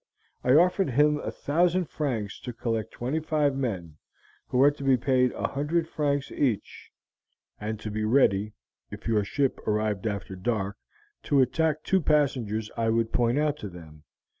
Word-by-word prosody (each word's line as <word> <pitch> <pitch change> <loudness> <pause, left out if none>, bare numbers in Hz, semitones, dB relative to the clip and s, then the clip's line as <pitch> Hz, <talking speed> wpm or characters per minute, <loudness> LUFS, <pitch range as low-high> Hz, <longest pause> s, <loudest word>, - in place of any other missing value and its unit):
I 125 +2 +4
offered 180 +1 +4
him 150 +3 +3
a - - -4
thousand 175 +4 +1
francs 125 -10 -3
to 125 - -6
collect 115 -1 -2
twenty 130 +6 -2
five 150 -3 +1
men, 95 - -3 0.5
who - - -2
were 140 +3 +6
to 145 -1 -9
be 135 -2 +4
paid 125 0 +2
a - - -2
hundred 155 +4 -1
francs 145 -3 -1
each, 125 -8 -2 0.7
and 110 +1 -4
to 110 - -5
be 110 +1 -2
ready, 105 -3 +3 0.4
if - - -8
your 110 -2 +2
ship 135 +6 -1
arrived 105 -1 0
after 100 -2 -4
dark, 100 0 -2 0.5
to 145 - +3
attack 155 +4 +1
two 190 -1 +2
passengers 125 -9 +1
I 115 -1 0
would 115 0 0
point 120 +1 +2
out 150 0 +1
to 105 - -6
them. 80 -4 -13
125 Hz, 165 wpm, -27 LUFS, 110-145 Hz, 0.7 s, were